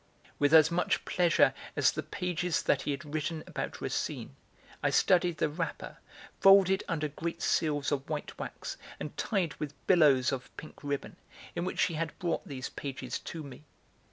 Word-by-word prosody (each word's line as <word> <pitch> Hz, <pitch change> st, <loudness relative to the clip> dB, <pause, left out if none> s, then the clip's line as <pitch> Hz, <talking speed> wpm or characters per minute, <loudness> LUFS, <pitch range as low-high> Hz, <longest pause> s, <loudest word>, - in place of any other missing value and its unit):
With 145 Hz, 0 st, +3 dB
as 160 Hz, 0 st, +7 dB
much 175 Hz, +1 st, 0 dB
pleasure 175 Hz, -2 st, +4 dB, 0.2 s
as -, -, +4 dB
the -, -, -3 dB
pages 180 Hz, -2 st, -2 dB
that 140 Hz, -, +2 dB
he 150 Hz, -, -4 dB
had 145 Hz, +1 st, -4 dB
written 155 Hz, +1 st, -2 dB
about -, -, -5 dB
Racine, -, -, -3 dB, 0.5 s
I -, -, +2 dB
studied 175 Hz, -3 st, +3 dB
the 155 Hz, -, +2 dB
wrapper, 165 Hz, +3 st, -4 dB, 0.4 s
folded 195 Hz, 0 st, +6 dB
under 155 Hz, -3 st, -1 dB
great 165 Hz, +3 st, -5 dB
seals 145 Hz, -3 st, +1 dB
of 140 Hz, 0 st, -2 dB
white 150 Hz, -2 st, -4 dB
wax -, -, -6 dB, 0.2 s
and -, -, -6 dB
tied 185 Hz, -8 st, 0 dB
with 150 Hz, -1 st, -4 dB
billows 145 Hz, -8 st, +5 dB
of 130 Hz, -2 st, -4 dB
pink 155 Hz, -, -10 dB
ribbon, 140 Hz, -1 st, -3 dB, 0.4 s
in 175 Hz, -, -1 dB
which 185 Hz, -, -4 dB
she 170 Hz, -, +3 dB
had 160 Hz, 0 st, -3 dB
brought 170 Hz, -2 st, -2 dB
those 130 Hz, -3 st, -5 dB
pages 140 Hz, -2 st, -5 dB
to 165 Hz, -2 st, -7 dB
me. 140 Hz, 0 st, -11 dB
155 Hz, 170 wpm, -30 LUFS, 145-175 Hz, 0.5 s, as